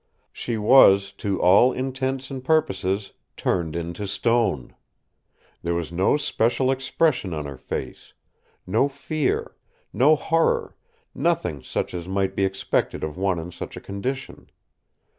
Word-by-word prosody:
She 120 -2 -3
was, 100 -4 +6
to 100 -2 -1
all 100 +8 +6
intents 130 +1 -3
and 130 -1 -6
purposes, 100 -10 0 0.2
turned 85 -3 -1
into 85 +4 -4
stone. 105 - 0 0.9
There 85 0 -1
was 85 -2 -3
no 95 +11 +2
special 130 -2 +1
expression 135 - 0
on 75 -1 -4
her 70 -1 -6
face—no 110 - -4
fear, 140 +1 -2 0.4
no 150 +5 +5
horror; 165 +2 +1 0.4
nothing 75 -3 0
such - - -3
as 90 -1 -5
might 95 0 -1
be 100 - +2
expected 95 0 -1
of 80 -1 -3
one 95 -1 0
in 85 +2 -6
such - - -8
a - - -5
condition. 130 +7 -5
100 Hz, 130 wpm, -24 LUFS, 90-130 Hz, 0.9 s, was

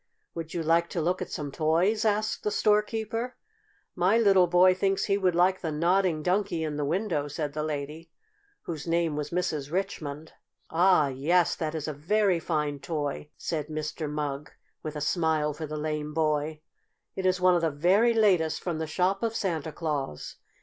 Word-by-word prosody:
"Would 165 0 -6
you 170 - -1
like 165 +2 +2
to - - -3
look 180 +4 0
at 185 - -4
some 145 -2 -5
toys?" 175 - +1
asked 215 0 0
the - - +1
storekeeper. 220 +3 0 0.6
"My 185 +5 +3
little 195 -5 +5
boy 180 +2 +5
thinks 195 +1 0
he 195 - +2
would 185 -3 +1
like 185 +2 +3
the 160 - -2
Nodding 170 +1 +1
Donkey 180 -2 0
in 155 -2 -3
the 145 - -2
window," 165 -2 -1
said 145 0 -4
the 155 - -2
lady, 150 +2 -5 0.5
whose 160 -2 -6
name 165 -2 +1
was 150 0 -3
Mrs. 155 -5 -2
Richmond. 160 -5 -4 0.4
"Ah, 170 -3 +4
yes, 160 +7 +2
that 160 -1 -3
is 155 -1 -4
a 155 - -2
very 185 +5 +1
fine 150 -3 -2
toy!" 150 -1 -4
said 155 -3 -3
Mr. 155 0 -4
Mugg, 150 -1 -4 0.3
with 155 -1 -6
a 150 - -4
smile 155 -1 +1
for 155 +1 -6
the 155 +1 -5
lame 150 0 -3
boy. 155 -1 0 0.5
"It 190 -1 0
is 185 0 +2
one 180 0 +5
of 175 - +2
the 165 - +2
very 190 +11 +3
latest 185 -8 +3
from 170 -3 -2
the 160 - -3
shop 185 +4 0
of 225 -1 -1
Santa 165 -7 -2
Claus. 150 - -4
165 Hz, 185 wpm, -27 LUFS, 150-185 Hz, 0.6 s, little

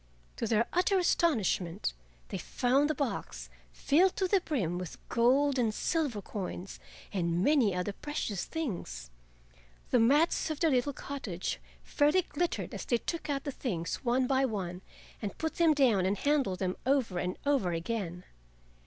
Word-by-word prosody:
To 230 - -1
their 225 +1 +3
utter 370 +2 +3
astonishment 215 - +1 0.4
they - - -4
found 270 +4 +1
the 310 - 0
box 275 -3 -4 0.2
filled 355 +6 +3
to 380 -2 +1
the 390 0 +3
brim 190 - -1
with 180 -2 -6
gold 265 +3 +3
and 230 -3 +2
silver 260 - -1
coins 190 -1 -6 0.3
and 175 -2 0
many 250 -10 +3
other 180 +3 -2
precious 215 -8 -3
things. 170 - -5 0.8
The 250 - +5
mats 290 +8 +3
of 310 -2 -3
their 325 -2 +3
little 255 +2 +2
cottage 240 -12 -4 0.2
fairly 300 +5 +3
glittered 345 +2 -2
as - - -5
they 240 - +2
took 315 +6 -4
out 275 -1 -1
the 285 - -3
things 180 -11 -3
one 255 0 +1
by 265 +1 +2
one 190 -7 -2 0.4
and 205 -3 -4
put 320 0 -3
them 335 -2 +5
down 225 -10 +4
and 200 +2 0
handled 280 -10 +1
them 185 -1 -2
over 255 -9 +1
and 180 +1 -2
over 275 -11 +2
again. 175 0 -3
245 Hz, 160 wpm, -31 LUFS, 190-290 Hz, 0.8 s, The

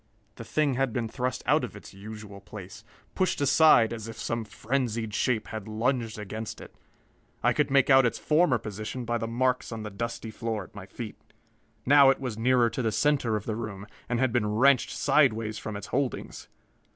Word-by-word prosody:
The - - -7
thing 145 +4 +1
had 130 -2 0
been 115 0 -1
thrust 125 +1 -3
out - - +3
of - - -5
its - - -12
usual 105 0 -9
place, 105 +1 -10 0.3
pushed 185 - 0
aside 140 -5 +5
as 110 -1 -6
if 115 - -8
some 115 -1 -3
frenzied 115 -1 -2
shape 115 -1 0
had 110 -2 -6
lunged 115 +1 -1
against 110 +1 -6
it. - - -12 0.7
I - - +4
could - - +1
make 135 0 +4
out 135 0 +7
its 120 - 0
former 150 -4 +3
position 110 +3 -6
by 120 0 -1
the 115 - -3
marks 125 +2 0
on 110 -1 -5
the 105 - -6
dusty 115 +2 -5
floor 110 -2 -3
at - - -16
my 100 -1 -9
feet. 110 +2 -8 0.7
Now 140 0 +7
it 135 - +2
was 125 -5 -4
nearer 120 +1 +3
to - - -3
the 110 -2 0
center 135 -4 +1
of 105 - -4
the 110 - -2
room, 105 -3 -6 0.2
and 120 -1 0
had 130 -3 +1
been 115 -4 +1
wrenched 130 +4 +4
sidewise 110 -7 +2
from 105 -1 -5
its 100 - -7
holdings. 135 -1 -2
115 Hz, 200 wpm, -27 LUFS, 110-130 Hz, 0.7 s, out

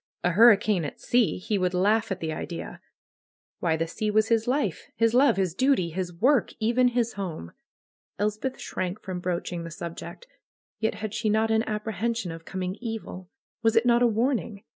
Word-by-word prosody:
A 180 - +2
hurricane 210 -2 +5
at 145 - -6
sea! 240 -3 +2
He 200 +2 -1
would 180 0 0
laugh 205 +4 +2
at 190 - -3
the 160 -1 -2
idea. 170 +1 -6 0.8
Why, 160 -2 +1
the 165 - 0
sea 210 +6 -3
was 215 +1 +2
his 225 -1 +2
life, 250 - -1
his 230 0 +2
love, 260 -4 +5
his 185 -4 0
duty, 250 -6 +2
his 180 +1 -3
work, 240 +9 +2
even 240 +3 +3
his 240 -1 0
home. 165 - -5 0.7
Elspeth 215 +6 -2
shrank 185 +2 -4
from 185 -2 -4
broaching 175 -1 -3
the 165 - -6
subject. 170 - -8 0.5
Yet 220 -1 0
had 215 0 -5
she 220 -1 -1
not 220 +1 +2
an 220 0 +3
apprehension 220 -1 -2
of 165 0 -9
coming 185 +1 -4
evil? 220 -6 -6 0.3
Was 225 0 +2
it 225 - +4
not 240 0 +4
a 245 - +6
warn 235 +3 +1
ing? 200 -4 -10
210 Hz, 185 wpm, -26 LUFS, 180-230 Hz, 0.8 s, a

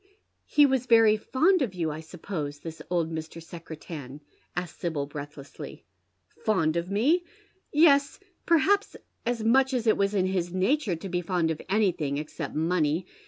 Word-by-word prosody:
" - - -48
He 295 - +9
was 260 -2 +1
very 225 -2 +6
fond 320 - +2
of 220 -8 -1
you, 165 -3 -1
I 150 - -6
suppose, 160 -3 -5
this 160 -1 -8
old 170 -2 0
Mr. 160 +1 -6
Secretan? 160 -4 -9 0.2
" - - -38
asks 180 -1 -5
Sibyl, 160 -5 -2
breathlessly. 145 -1 -9 0.3
" - - -31
Fond 165 -7 +2
of 170 +1 -2
me 235 - +3
V - - -11 0.5
Yes, 290 -1 +4 0.3
perhaps 385 +5 +3 0.3
as 240 -2 -1
much 260 +3 +3
as 240 -2 -1
it 220 - +4
was 200 +1 +1
in 185 -2 +2
liis 185 -2 -1
natura 195 - +1
to 165 +4 -7
be 180 -1 -1
fond 170 -2 0
of 155 - -4
anything, 180 -9 +1
except 150 +1 -5
money. 160 +1 +1
180 Hz, 175 wpm, -27 LUFS, 160-230 Hz, 0.5 s, He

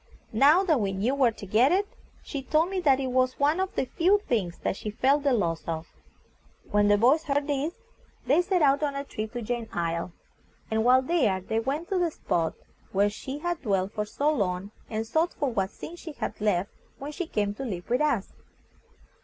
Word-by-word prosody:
Now 290 - +6
that 320 -8 +2
we 195 -1 -1
knew 210 +7 0
where 270 -3 +4
to 210 - -10
get 225 +9 +4
it, 395 +3 +2 0.4
she 280 - -5
told 315 +7 +1
me 385 - -1
that 275 -6 +3
it 260 -2 -2
was 255 0 +1
one 295 +5 +2
of 380 0 -2
the - - 0
few 365 +9 +3
things 190 -8 -1
that - - 0
she 210 - -5
felt 270 +7 +2
the 280 -1 +2
loss 170 -9 0
of. 165 0 -3 0.9
When 205 0 +4
the 205 0 +5
boys 270 +9 +4
heard 285 0 0
this, 290 +3 -1 0.5
they 285 +8 +4
set 360 -2 +1
out 280 0 +4
on 285 -2 -1
a 280 - -3
trip 215 -5 -5
to 240 -1 -4
Jane's 235 0 -3
Isle, 170 0 -2 0.6
and 220 0 +1
while 255 +2 +5
there 255 - +2
they 220 +4 -2
went 280 +8 -2
to 385 - +1
the 350 -1 +2
spot 165 - -1 0.4
where 200 +1 +2
she 265 +6 -6
had 345 +2 -3
dwelt 195 -5 0
for 210 -1 -2
so 290 +8 0
long, 195 -5 -2 0.2
and 220 0 -2
sought 320 +9 0
for 280 -3 -1
what 195 -3 0
things 340 +9 -9
she 320 - -8
had 285 - -5
left 200 -2 +1 0.3
when 280 +2 -6
she 350 +2 -4
came 205 -7 -1
to 240 - -6
live 185 -8 -5
with 245 +3 +1
us. 280 -10 0
255 Hz, 215 wpm, -27 LUFS, 205-300 Hz, 0.9 s, Now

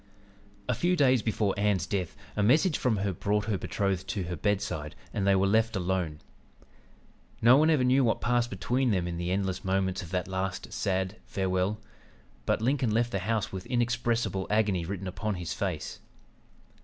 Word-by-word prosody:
"A 125 - +2
few 175 +9 +1
days 130 -6 +4
before 105 -2 0
Ann's 100 -4 +1
death 95 -3 -3 0.2
a 105 - 0
message 150 - +4
from 120 -4 +1
her 100 0 -1
brought 105 +4 0
her 105 -2 0
betrothed 95 -2 -1
to 100 - -2
her 90 0 -4
bedside, 95 -5 -2 0.2
and 100 -1 0
they 100 - +5
were 95 +1 +3
left 110 +3 +2
alone. 90 -5 -1 1.2
No 120 +3 +7
one 155 +3 +5
ever 150 -5 +3
knew 130 +2 +4
what 115 - +2
passed 120 -1 +1
between 120 +7 0
them 90 -5 +1
in 85 -1 -4
the 85 +1 -2
endless 95 -1 -1
moments 95 0 0
of 85 - -9
that 90 0 -2
last 95 0 -3
sad 95 +1 -1
farewell; 95 +2 0 0.7
but - - +1
Lincoln 130 -1 +2
left 120 +2 +1
the 95 - -1
house 110 +2 -1
with 95 +1 -6
inexpressible 120 -5 0
agony 105 -5 +1
written 95 0 -4
upon 105 +3 -3
his 90 -2 -4
face. - - -3
100 Hz, 180 wpm, -29 LUFS, 95-115 Hz, 1.2 s, No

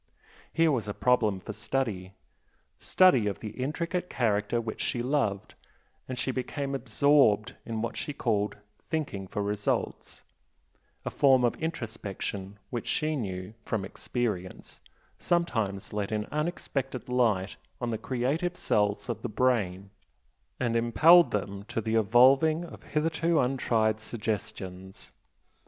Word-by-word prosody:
Here 165 -1 +3
was 120 -6 -1
a 105 - -4
problem 110 -6 +2
for 110 - -6
study, 105 -4 -2 0.7
study 135 - +4
of 100 - -2
the 110 - -6
intricate 170 +7 -3
character 105 -1 +1
which 115 -1 -5
she 120 - -1
loved 125 -8 -1 0.5
and 130 - -5
she 130 - 0
became 135 +2 -3
absorbed 135 -5 +3
in 115 -1 -2
what 115 - -3
she - - -3
called 105 -7 -1 0.3
"thinking 145 - -3
for 105 - -3
results," 105 0 -2 0.8
a - - -2
form 130 -3 +4
of 120 - +3
introspection 105 - -4
which 120 - -4
she 155 0 0
knew, 95 -5 -4
from 105 -4 -2
experience, 100 -3 -4 0.4
sometimes 115 - -1
let 105 0 -2
in 105 -1 -1
unexpected 145 -4 -3
light 115 -7 +1 0.2
on 120 -1 -2
the 110 - -2
creative 145 +8 -1
cells 105 -1 +1
of 115 -3 -3
the 120 - -3
brain 100 -5 0 0.7
and 120 -2 0
impelled 155 +10 +6
them 100 -1 -3
to 115 - -3
the 110 0 -2
evolving 130 - +5
of - - -11
hitherto 165 +1 0
untried 115 -4 +1
suggestions. 100 -4 -5
115 Hz, 130 wpm, -28 LUFS, 105-135 Hz, 0.8 s, impelled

